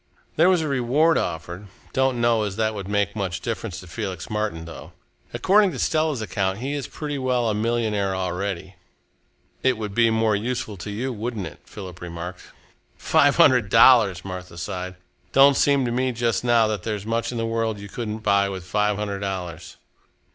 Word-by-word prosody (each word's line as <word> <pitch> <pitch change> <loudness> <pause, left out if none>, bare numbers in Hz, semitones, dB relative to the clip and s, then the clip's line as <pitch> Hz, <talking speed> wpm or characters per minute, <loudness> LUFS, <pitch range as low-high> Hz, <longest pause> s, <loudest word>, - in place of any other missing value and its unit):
"There 170 +4 +5
was 180 -3 +3
a - - -2
reward 140 +5 +2
offered. 85 +5 -5 0.3
Don't 130 -2 +1
know 120 -1 +3
as 100 -3 -2
that 110 0 0
would 100 -3 -6
make 100 0 0
much 95 -4 -2
difference 105 -4 -4
to - - -12
Felix 95 -1 -5
Martin, 105 -6 -2
though. 85 - -10 0.4
According 200 0 +3
to - - -6
Stella's 155 -7 0
account, 95 -1 -1
he 135 +5 -3
is 145 -2 -3
pretty 145 -2 -5
well 125 -2 +1
a 110 - +1
millionaire 105 -3 0
already." 95 0 -3 0.9
"It 130 -2 +2
would 105 -2 -5
be 115 +1 +4
more 110 -1 +2
useful 115 0 -3
to 85 +3 -7
you, 125 +6 -3
wouldn't 110 -2 -4
it?" - - -9
Philip 90 -4 -10
remarked. 85 +1 -7 0.6
"Five - - +3
hundred 125 -6 +5
dollars!" 110 -5 +6
Martha 90 -2 -7
sighed. 90 +2 -5 0.4
"Don't 140 +1 +7
seem 140 -1 +3
to 120 - -1
me 130 +2 0
just 115 0 0
now 120 -2 +4
that 105 -3 -2
there's 105 0 -4
much 115 +1 -1
in 120 - -5
the 115 - -1
world 115 -1 -1
you 100 - -8
couldn't 110 +1 -5
buy 100 -1 +3
with 95 -2 -6
five 105 +3 0
hundred 100 -2 -3
dollars." 90 -5 -5
110 Hz, 185 wpm, -23 LUFS, 95-120 Hz, 0.9 s, Don't